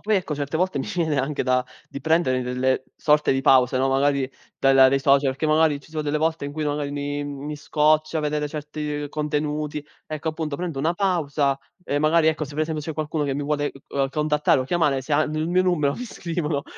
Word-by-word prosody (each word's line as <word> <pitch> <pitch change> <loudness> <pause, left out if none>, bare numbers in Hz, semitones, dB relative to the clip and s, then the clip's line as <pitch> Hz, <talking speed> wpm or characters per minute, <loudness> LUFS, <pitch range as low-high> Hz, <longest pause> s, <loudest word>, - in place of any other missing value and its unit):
poi 215 -1 +1
ecco 165 -5 -2
certe 145 +2 -3
volte 185 +1 0
mi - - -3
viene 160 -5 0
anche 135 +2 -1
da 130 0 +1 0.2
di 140 - -7
prendere 160 -6 +2
delle 130 +1 0
sorte 150 -2 +3
di 135 - 0
pause, 130 -1 +4
no, 135 +1 +2
magari 135 0 +1 0.3
dal 135 0 +4
dai 135 +1 +6
social, 135 -1 +3
che 155 - -1
magari 155 -2 +3
ci 155 - -19
sono 155 -1 -3
delle 150 +1 -1
volte 160 -1 0
in 145 - -5
cui 155 0 -3
magari 145 -1 -2
mi 145 0 -3
mi 145 +1 -6
scoccia 155 +1 +1
vedere 150 0 -1
certi 150 -1 -4
contenuti. 150 0 -2 0.2
Ecco 155 +1 -4
appunto, 155 -2 -3
prendo 170 -6 -4
una 160 +5 +1
pausa 150 -7 0 0.3
e 145 - -1
magari 155 +2 +3
ecco, 155 -1 +1
se 145 - -10
per 155 +2 0
esempio 155 -1 -4
c'è 160 - -4
qualcuno 155 0 -2
che 135 -1 -1
mi 145 - -2
vuole, 145 0 0 0.2
ehm, 135 -1 -1
contattare 150 -2 +2
o - - -2
chiamare, 145 -3 +1
se 145 +3 -6
hanno 155 +1 +1
il 160 +2 -1
mio 185 +1 +3
numero 155 -6 +1
mi 250 - -6
scrivono 165 -8 -3
o - - -7
150 Hz, 220 wpm, -23 LUFS, 140-155 Hz, 0.3 s, dai